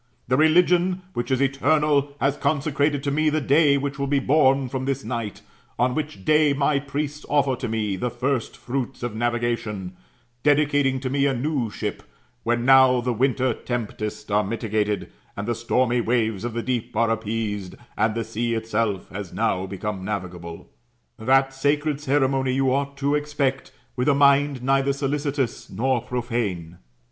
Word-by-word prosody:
The 125 - +2
religion 175 +4 +3
which 120 - -3
is 130 0 +1
eternal 140 +1 +2
has 140 +1 +1
consecrated 145 0 0
to 140 - 0
me 155 +2 +2
the 155 +1 +1
day 145 +1 +4
which 140 0 -3
will 140 - -1
be 140 +1 +2
bom 135 -1 +3
from 130 +1 -4
this 135 0 -2
night; 115 -3 -4 0.3
on 125 +1 +2
which 150 -9 -4
day 150 -1 +4
my 140 0 +1
priests 145 +2 -4
offer 140 -3 +2
to 125 - -4
me 110 -3 -1
the 125 +6 -1
first 125 +1 -2
fruits 130 0 -4
of 120 -3 -3
navigation, 115 -5 -2 0.5
dedicating 145 -2 +2
to 130 - -2
me 140 0 +2
a 135 - 0
new 130 -2 -1
ship, - - -4 0.4
when 120 +1 0
now 130 -1 +6
the 125 0 -1
winter 130 +1 +1
tempests 110 -3 -5
are 105 +1 +3
mitigated, 105 - -2 0.3
and 100 +2 -4
the 120 - +1
stormy 120 +1 +1
waves 110 -3 0
of 120 -1 -3
the 115 0 -3
deep 120 -1 -3
are 115 -1 +3
appeased, 110 -3 -3 0.2
and 110 0 +1
the 115 - -1
sea 115 +1 -2
itself 110 -3 -1
hsis 95 -2 -6
now 95 +1 0
become 95 0 -4
navig 95 -3 -3
able. 85 -1 -9 0.5
That 135 +4 +3
sacred 145 +2 0
ceremony 135 -2 +1
you 135 -1 +2
ought 140 0 -2
to 140 +1 0
expect, 145 -2 -1 0.2
with 125 +2 +1
a 140 - +4
mind 140 -2 +3
neither 135 +1 +2
solicitous 140 -2 -2
nor 125 +5 0
profane. 110 -10 -3
130 Hz, 170 wpm, -24 LUFS, 115-140 Hz, 0.5 s, now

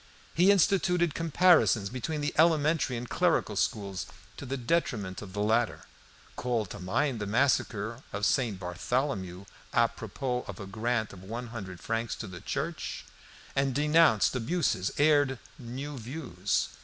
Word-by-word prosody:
He 180 +4 +4
instituted 180 -4 +3
comparisons 165 - +4
between 150 +5 -3
the 145 - -1
elementary 155 -4 +3
and 120 +1 -5
clerical - - +1
schools 100 -3 -1 0.3
to 140 - -7
the 135 +2 -2
detriment 115 - -1
of 100 -3 -9
the 105 0 -1
latter; 115 +2 +1 0.5
called 115 -6 -1
to 105 - -7
mind 115 +8 0
the 105 - -3
massacre 115 -1 +1
of 105 +1 -1
St. 105 -1 +1
Bartholomew 95 0 -2 0.3
a 115 0 +5
propos 125 +3 -4
of 100 - -7
a 100 - -6
grant 110 +2 -1
of 95 -1 -12
one 115 +4 -6
hundred 95 -6 -7
francs 115 0 -2
to - - -6
the 95 -4 -9
church, - - -4 0.5
and 135 -2 +1
denounced 150 -6 +4
abuses, 125 - 0
aired 145 -3 +4 0.2
new 130 +3 -6
views. 115 - -2
120 Hz, 145 wpm, -29 LUFS, 105-145 Hz, 0.5 s, a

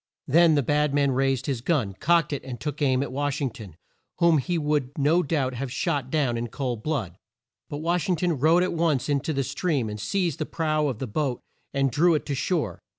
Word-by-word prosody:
Then 165 +2 +5
the 145 - +2
bad 150 +2 +1
man 140 -1 +3
raised 135 -1 +1
his 130 -5 -2
gun, 125 - 0
cocked 165 - +2
it, 140 - -4
and 125 -2 -7
took 150 0 -5
aim 130 -2 +2
at 140 - -6
Wash 145 +1 -1
ing 135 -4 -1
ton, 105 -8 -11 0.4
whom 170 -3 +4
he 175 +5 -1
would 150 -4 0
no 155 +5 +3
doubt 140 -5 -1
have 130 +1 -4
shot 140 -3 -1
down 130 -7 0
in 120 - -3
cold 120 -2 -4
blood. 110 - -3 0.5
But 150 0 -5
Wash 175 +1 0
ing 180 - +3
ton 170 -3 -1
rode 165 +5 +4
at 185 - -1
once 160 -5 0
in 145 -1 +2
to 160 - -3
the 135 -2 0
stream, 140 -3 -1
and 105 - -6
seized 175 - -1
the 155 - -2
prow 155 -2 0
of 130 -6 -2
the 135 - -4
boat, 130 +2 -2 0.3
and 135 -1 +1
drew 165 +6 +4
it 150 - -2
to 145 - -2
shore. 160 +4 -1
145 Hz, 230 wpm, -25 LUFS, 130-160 Hz, 0.5 s, Then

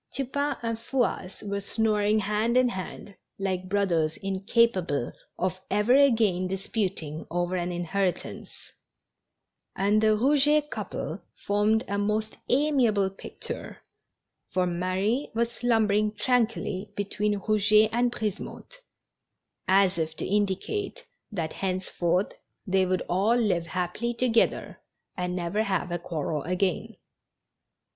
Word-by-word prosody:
Tupain 280 +2 -1
and 230 -1 -2
Fouasse 235 -6 -2
were 200 0 -2
snoring 210 0 +1
hand 210 +4 +1
in 255 -1 +5
hand, 195 0 -6 0.2
like 185 -1 -2
brothers 170 -6 +1
incapable 195 - +1 0.3
of 185 +1 -1
ever 210 +4 +3
again 225 -10 +4
disputing 185 -5 -3
over 175 +1 -1
an 175 0 -1
inheritance, 175 +2 -3 1.0
and 205 +2 +3
tlie 215 -1 +4
Eouget 295 +3 +3
couple - - -4 0.2
formed 210 +3 +2
a 200 0 -1
most 215 +1 -1
amiable 245 -8 +3
picture, 195 - -7 0.7
for 185 -1 +2
Marie 185 +9 0
was 235 +1 +1
slumbering 215 -3 +2
tranquilly 215 -3 0
between 205 +1 -1
Eouget 215 +1 +4
and 240 +1 +2
Brisemotte, 220 - -5 0.9
as 190 -1 +4
if 160 0 -2
to - - -3
indicate 210 - -1 0.3
that 165 -6 -3
henceforth 185 -1 -1 0.3
they 190 -1 +2
would 185 -1 0
all 195 +6 +2
live 195 -8 +1
happily 185 +7 -2
together 235 -1 +1 0.3
and 180 -1 -2
never 180 +4 -1
have 190 -4 -1
a 175 - -1
quarrel 155 -3 -3
again. 185 +6 -1
205 Hz, 115 wpm, -27 LUFS, 185-225 Hz, 1.0 s, in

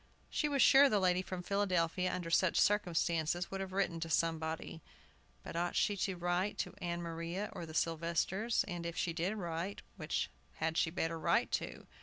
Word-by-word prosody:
She 300 - 0
was 280 -2 +4
sure 275 +1 +8
the 210 - +3
lady 180 -1 +3
from 185 -1 -5
Philadelphia, 185 -2 +1
under 175 -2 -4
such 185 +1 +3
circumstances, 175 -3 +1
would 195 0 -3
have 190 -1 -5
written 185 -3 0
to 165 0 -4
somebody. 160 0 -1 0.6
But - - -8
ought 175 +1 -1
she 205 - +2
to 190 0 -1
write 175 +3 -1
to - - -3
Ann 175 0 -2
Maria 170 +4 -4
or 170 - -6
the 160 - -9
Sylvesters? 170 +8 +1
And, 175 -3 -4
if 170 - -6
she 170 - 0
did 180 +5 -1
write, 175 0 -4
which 155 -3 -2 0.2
had 160 +1 -1
she 165 - +2
better 165 -1 -2
write - - +2
to? - - -3
175 Hz, 185 wpm, -34 LUFS, 165-190 Hz, 0.6 s, sure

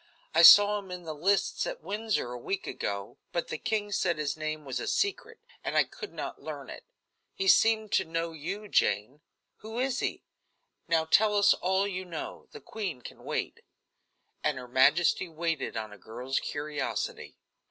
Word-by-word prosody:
I - - +5
saw 205 0 +9
him 195 -2 -12
in 180 -1 -7
the 160 -2 -5
lists 190 +7 +1
at - - -6
Windsor 210 - -2
a 125 - -5
week 195 +10 -3
ago, 100 0 -4
but 170 - -2
the - - -3
king 210 -2 -1
said 175 -4 +1
his 150 -2 -1
name 155 -1 -4
was 130 -2 -3
a - - -4
secret, 405 +3 -1 0.2
and - - -1
I - - +6
could 420 -4 -9
not - - -6
learn - - -7
it. - - -10 0.5
He 385 0 -2
seemed 220 - +4
to - - +3
know 165 +1 -2
you, 185 +7 -6
Jane. 130 - +1 0.4
Who 220 +2 -8
is 260 +1 0
he? - - -3 0.6
Now 165 -1 +2
tell 210 +6 +4
us 200 0 +6
all 190 +2 0
you 185 -2 -4
know. 170 -4 -7
The 445 - -11
queen 185 - -5
can - - -11
wait." - - -3 0.8
And 150 -3 +1
her 125 -1 -7
majesty 130 +9 +3
waited 165 -5 -2
on 110 -1 -5
a 105 - -14
girl's 125 +6 -3
curiosity. 150 0 -4
175 Hz, 180 wpm, -29 LUFS, 150-210 Hz, 0.8 s, saw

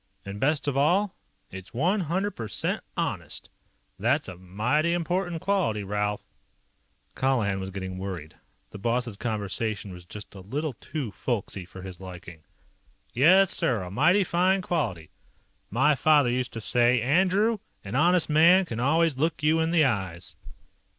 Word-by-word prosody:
And 100 +1 -6
best 145 +3 +1
of 140 - 0
all, 180 +9 +2 0.4
it's 95 +4 -10
one 180 - +2
hundred 190 +4 -1
percent 110 - -3
honest. - - -3 0.5
That's - - +1
a 90 - -7
mighty 115 - 0
important 175 0 -1
quality, 180 - 0
Ralph." 105 +1 -2 0.9
Colihan 115 -7 +1
was 95 0 -5
getting 95 -1 -6
worried. 90 -5 -6 0.4
The 100 - -9
boss's 120 +1 -1
conversation 105 -2 -3
was 90 0 -10
just 105 +4 -8
a 100 - -10
little 135 +10 -3
too 130 0 -5
folksy 100 -3 -3
for 95 +1 -11
his 95 -1 -9
liking. 90 -3 -10 0.7
"Yes, 185 +9 +5
sir, 115 -7 0
a 90 - -7
mighty 175 - +4
fine 185 +2 +2
quality. 110 - -2 0.6
My 130 +8 +3
father 145 -2 +4
used 125 0 -2
to 115 - -5
say: 120 +2 +3
'Andrew, 190 - +2 0.2
an 100 - -7
honest 170 +5 +3
man 170 +5 +5
can 115 -9 -5
always 150 +2 +2
look 150 -2 0
you 155 +2 +3
in 160 0 +1
the 165 -3 +4
eyes.'" 95 -8 -2
125 Hz, 150 wpm, -26 LUFS, 100-165 Hz, 0.9 s, Yes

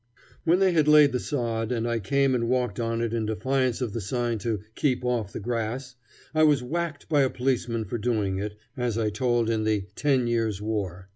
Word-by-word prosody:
When 170 +2 +4
they 190 -1 +4
had 155 -3 +2
laid 150 -2 +7
the 125 - -1
sod, 115 -5 -2
and 120 -1 -1
I 115 -1 0
came 135 +5 +2
and 115 -2 0
walked 125 -1 0
on 115 0 -1
it 115 -1 -1
in 115 -2 -1
defiance 130 +2 0
of 115 -5 -2
the 115 - -3
sign 120 +2 -1
to 110 -1 -2
"keep 130 -2 0
off 120 -5 -1
the - - -5
grass," 120 +3 -3 0.4
I 155 - +2
was 145 -4 +4
whacked 155 +2 -3
by 145 -2 +3
a 135 - +3
policeman 120 -3 -1
for 115 +4 -4
doing 105 -4 0
it, 105 +1 -4 0.2
as 125 -3 -1
I 110 -2 0
told 120 +1 +1
in 110 -1 0
the 105 -3 0
"Ten 135 -4 +1
Years' 115 -4 0
War." 100 -4 -3
120 Hz, 215 wpm, -26 LUFS, 110-130 Hz, 0.4 s, laid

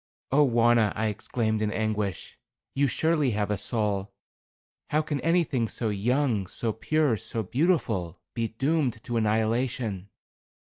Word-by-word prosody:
"Oh, 145 +2 +5
Wauna," 115 -3 +3
I 110 +1 0
exclaimed, 110 +1 -2
in 105 -1 0
anguish, 105 -4 -2 0.4
"you 140 +1 +2
surely 155 +2 +1
have 105 0 0
a - - +2
soul. 105 -4 -1 0.8
How 155 +1 +2
can 145 -2 -3
anything 165 -8 +1
so 110 0 -2
young, 110 0 +1
so 110 +4 -2
pure, 150 +2 +1
so 110 +1 -4
beautiful, 115 - 0
be 115 -2 -1
doomed 135 -1 -1
to 120 -1 -2
annihilation?" 110 -2 0
115 Hz, 135 wpm, -27 LUFS, 105-135 Hz, 0.8 s, Oh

